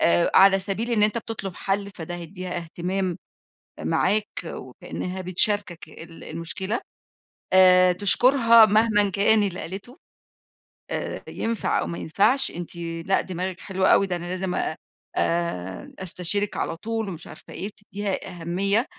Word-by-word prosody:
آآ، 170 0 +3
على 195 0 +7
سبيل 205 +5 -1
إن 220 -3 +2
أنت 210 +2 +3
بتطلب 205 -5 -6
حل، 200 +1 -2
فده 175 -2 -7
هيديها 180 +1 -7
اهتمام 175 +2 -3 0.6
معاك، 200 - +1 0.2
وكأنها 185 +1 -6
بتشاركك 185 -2 0
ال 165 +2 -12
المشكلة. 180 +7 -4 0.7
آآ، 185 -1 +7
تشكرها 230 +4 +7
مهمًا 210 -1 +3
كان 205 +2 +3
اللي 190 -3 -3
قالته 200 - -8 0.9
آآ، - - -4
ينفع 230 -1 -1
أو - - -2
ما 170 - -5
ينفعش، 220 - +2
أنتِ 175 0 -7 0.3
لأ 195 - +2
دماغِك 185 0 -5
حلوة 190 -1 -1
أوي، 195 - +3
ده 180 - -2
أنا 175 0 -6
لازم 185 +1 -3
أ 155 - -2 0.4
آآ، 95 - -2
أستشيرك 190 +2 -1
على - - -2
طول 225 +3 -4
ومش 170 -3 -8
عارفة 155 - -13
إيه، - - -5
وتديها 205 -1 -5
أهمية، 195 +7 0
190 Hz, 140 wpm, -24 LUFS, 175-205 Hz, 0.9 s, على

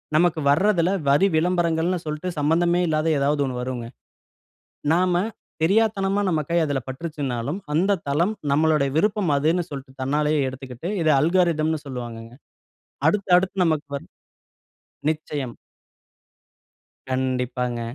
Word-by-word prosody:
நமக்கு 170 0 +3
வர்றதுல்ல 180 +3 +3 0.2
வரி 145 +8 +5
விளம்பரங்கள்னுனு 170 +1 +1
சொல்ட்டு 155 +4 -3
சம்பந்தமே 170 +4 +2
இல்லாத 155 0 +1
ஏதாவது 145 +1 +1
ஒண்ணு 125 -1 -4
வருங்க. 125 -2 -4 1.1
நாம 180 +1 +2 0.5
தெரியாத்தனமா 200 +1 +2
நம்ம 160 -4 +1
கை 170 - +3
அதுல 145 -3 -1
பட்டுருச்சுன்னாலும், 140 -1 -3 0.2
அந்த 190 +5 +2
தளம் 170 +10 +1 0.2
நம்மளுடைய 150 -2 +3
விருப்பம் 200 -1 +2
அதுன்னு 160 +5 +1
சொல்ட்டு 135 -1 -9
தன்னாலேயே 150 +2 +1
எடுத்துக்கிட்டு 130 +5 -7
இத 160 - +2
அல்கரிதம்ன்னு 160 -2 +1
சொல்வாங்கங்க. 120 -3 -7 0.8
அடுத்து 200 +2 0
அடுத்து 190 0 0
நமக்கு 155 -2 0
வ 140 - -5 1.1
நிச்சயம். 145 -5 -5 1.6
கண்டிப்பாங்க. 125 -2 -1
155 Hz, 110 wpm, -23 LUFS, 135-175 Hz, 1.6 s, வரி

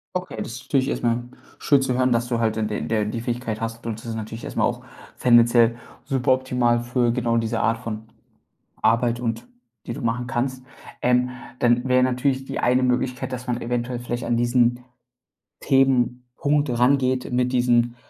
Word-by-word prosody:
Okay, 180 -8 -4
das - - -4
ist 130 - -9
natürlich 135 0 +1
erst - - -3
mal 120 0 +1 0.3
schön 140 -2 +3
zu 135 -1 0
hören, 130 0 +2
dass 120 0 +1
du 120 -1 -1
halt 110 -1 0
d 105 -1 -2
der 110 -2 0
die 115 +2 -3
Fähigkeit 120 -2 -3
hast 115 0 -5
und 115 -2 -3
das 115 - -14
ist 115 - -4
natürlich 110 +1 -6
erst - - -7
mal - - +3
auch - - -2 0.4
tendenziell 120 -1 +5 0.3
super 130 -2 +2
optimal 125 -2 +1
für 120 -1 +1
genau 120 -2 0
diese 115 0 -1
Art 115 0 +1
von 110 -2 -6 0.8
Arbeit 120 +1 +2
und 115 - -3 0.4
die 115 - -3
du - - -7
machen 120 +1 -1
kannst. 130 0 -2 0.4
Ähm, 125 0 +2 0.3
dann 120 +1 +2
wär 125 0 +4
natürlich 130 +1 0
die - - -4
eine 125 +1 +2
Möglichkeit, 125 +1 -1
dass 125 0 -6
man 125 -1 -2
eventuell 120 +1 -2
vielleicht 120 0 -4
an 120 0 +1
diesen 120 0 +2 0.8
Themenpunkt 135 +1 +1
rangeht 130 0 +2
mit 125 +1 +1
diesen 120 -1 +2
120 Hz, 180 wpm, -23 LUFS, 115-125 Hz, 0.8 s, tendenziell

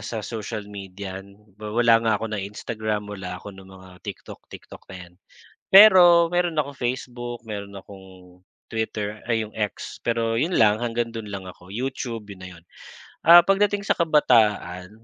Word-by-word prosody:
sa 110 -3 -5
social 110 -2 -6
media. 95 -1 -8 0.4
Wala 115 +2 +3
nga 110 -2 +1
ako 110 +1 -6
na 105 - -2
Instagram, 105 +1 -4
wala 95 -3 -7
ako 100 +2 -10
ng 95 0 -14
mga 95 -1 -15
TikTok, - - -9
TikTok - - -13
na 95 - -8
yan. - - -27 0.6
Pero 180 -4 +8
meron 175 -1 0
akong 140 -2 -2
Facebook, 120 -1 -4
meron 100 -1 -6
akong 95 -2 -14 0.3
Twitter, 105 -2 -4
ay 115 -1 +1
yung 105 - -10
X, 105 -2 -4
pero 115 -1 0
yun 170 +6 -1
lang 105 -2 +4
hanggang 120 0 -2
dun 115 -1 -7
lang 95 -2 -7
ako, 90 +1 -14
YouTube 120 -3 -5
'yun 95 -2 -11
na - - -8
yun. - - -28 0.6
Ah, 170 +1 +8
pagdating 200 0 +1
sa - - +2
kabataan 110 - +2
110 Hz, 165 wpm, -23 LUFS, 100-120 Hz, 0.6 s, Pero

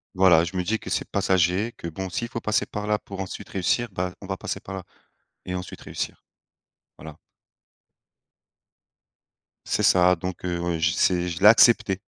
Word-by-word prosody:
Voilà, 90 -3 +5
je 85 - -7
me 90 - 0
dis 110 +5 -1
que - - -9
c'est - - 0
passager, 95 +3 +1
que 85 - -7
bon 95 +3 -5
s'il 115 +6 -3
faut 120 - -4
passer 110 -1 0
par 105 0 -6
là 105 - +2
pour 100 -2 -10
ensuite 95 -1 -6
réussir, 100 +6 0
bah 90 -1 -3
on 100 - -9
va 95 0 -3
passer - - -5
par 95 - -9
là 95 - -6 0.6
et 90 - -4
ensuite 90 0 -7
réussir. - - -6 0.8
Voilà. 80 -2 -10 2.5
C'est - - 0
ça 90 0 +5
donc 90 +1 -6
heu, 85 -1 -1
je 80 0 +2
c'est 90 0 +1
je 85 -1 -4
l'ai 100 - +6
accepté. 110 -3 +6
95 Hz, 180 wpm, -24 LUFS, 90-100 Hz, 2.5 s, l'ai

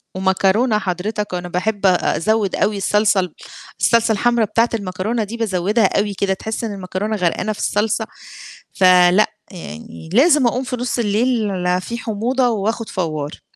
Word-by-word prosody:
ومكرونة 195 +5 +2
حضرتك، 205 +2 -3
وأنا 175 0 -4
باحب 200 +3 -2
أزود 195 +3 +1
أوي 205 0 0
الصلصة 210 0 +2
ال 180 -4 -3 0.5
الصلصة 230 -1 +3
الحمراء 235 0 +2
بتاعة 230 +3 +2
المكرونة 210 +2 -2
دي 225 +3 -6
بازودها 200 0 +1
أوي 205 0 -1
كده، 195 0 0
تحس 220 +4 -5
إن 215 -3 -3
المكرونة 195 +3 -3
غرقانة 185 +3 -1
في - - -12
الصلصة، 215 +1 0 0.7
فلأ 185 +2 +5 0.2
يعني 85 - -10
لازم 285 - +5
أقوم 255 +2 0
في 250 - -4
نُص 245 0 -2
الليل 205 -5 0
في 235 +5 -6
حموضة 240 +4 0
وآخد 220 +1 -2
فوار. 155 -5 -4
210 Hz, 145 wpm, -19 LUFS, 185-225 Hz, 0.7 s, فلأ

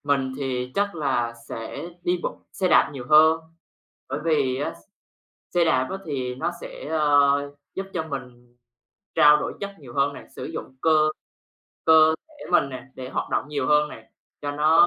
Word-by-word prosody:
Mình 140 -2 +1
thì 130 -2 -2
chắc 200 -2 0
là 130 -6 0 0.2
sẽ 115 +9 -6
đi 175 0 +1
bộ - - -4
xe 185 - 0
đạp - - +5
nhiều 130 -3 -7
hơn. 160 +1 +7 0.7
Bởi - - -2
vì 145 -6 +2
á, 145 - -2 0.8
xe 175 -1 +4
đạp 130 -5 +2
á, 190 - -2
thì 130 -4 -2
nó 130 - -1
sẽ, - - -8
ờ, 145 -2 +3 0.2
giúp 195 0 -4
cho 170 - -1
mình 125 -4 -8 0.6
trao 150 0 +7
đổi - - -3
chất 200 - -3
nhiều 125 -4 -12
hơn 140 +1 +2
nè, - - -10
sử - - -5
dụng 130 - -7
cơ 155 -1 +4 0.8
cơ 160 0 +7
thể 300 - -12
mình 175 -6 +4
nè 130 - -7
để 130 -1 -7
hoạt - - -3
động - - -1
nhiều 140 -3 -2
hơn 150 0 +4
nè, - - -12 0.3
cho 145 - -2
nó 155 +3 +5
145 Hz, 180 wpm, -24 LUFS, 130-160 Hz, 0.8 s, hơn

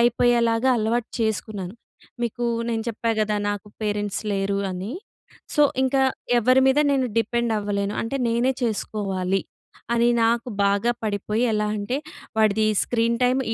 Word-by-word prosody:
అయిపోయేలాగా 240 0 +3
అలవాటు 225 +2 -1
చేసుకున్నాను. 210 -3 -2 0.5
మీకు 240 +1 -2 0.3
నేను 225 -1 -1
చెప్పా 230 +1 -2
గదా! 210 -1 +1
నాకు 205 -1 -5
పేరెంట్స్ 205 -1 -2
లేరు 195 0 0
అని. 190 +6 -5 0.6
సో, 295 - +5 0.2
ఇంక 265 +1 +1 0.4
ఎవ్వరి 255 +3 +4
మీద 265 - +3
నేను 260 -2 +1
డిపెండ్ 235 +1 0
అవ్వలేను. 205 0 -2
అంటే, 230 +4 -3
నేనే 240 +3 +2
చేసుకోవాలి. 195 -4 -1 0.5
అని 235 0 +3 0.2
నాకు 235 +2 +1 0.2
బాగా 200 +4 +2
పడిపోయి, 210 +2 -1
ఎలా 210 0 +1
అంటే, 210 +6 -2 0.4
వాడిది 215 0 +3 0.2
స్క్రీన్ 235 0 +1
టైమ్, 255 +2 +3
225 Hz, 135 wpm, -23 LUFS, 205-240 Hz, 0.6 s, సో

